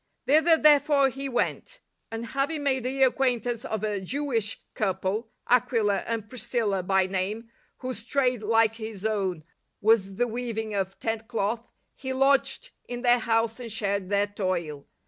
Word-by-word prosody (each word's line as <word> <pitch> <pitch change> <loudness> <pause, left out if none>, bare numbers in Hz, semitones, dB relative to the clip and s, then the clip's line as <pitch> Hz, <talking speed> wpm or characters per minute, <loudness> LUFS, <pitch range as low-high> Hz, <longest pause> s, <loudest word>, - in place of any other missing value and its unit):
Thither 315 +3 +5
therefore 290 -2 +5
he 275 +1 -5
went; - - -2 0.3
and 225 +1 -5
having 280 +5 -1
made 265 -3 +1
the 265 +1 +1
acquaintance 245 -3 +1
of 220 -1 -3
a 210 -2 -1
Jewish 230 -1 -1
couple, 195 +2 -1 0.2
Aquila 230 -5 +3
and 225 -2 -3
Priscilla 225 -5 -1
by 190 +1 +2
name, 200 +5 -3 0.3
whose 255 -3 -5
trade, 250 -2 +1
like 225 +1 +3
his 220 -3 -7
own, 190 -7 -1 0.4
was 205 -3 +3
the 245 - +2
weaving 225 -2 -3
of 195 -1 -2
tent 225 0 -3
cloth, 225 0 -2 0.2
he 260 -1 -5
lodged 275 - +2 0.2
in 245 0 -5
their 245 0 +5
house 225 0 0
and 235 -2 -6
shared 200 -3 -1
their 200 0 +2
toil. 185 -8 -3
225 Hz, 150 wpm, -27 LUFS, 205-255 Hz, 0.4 s, Thither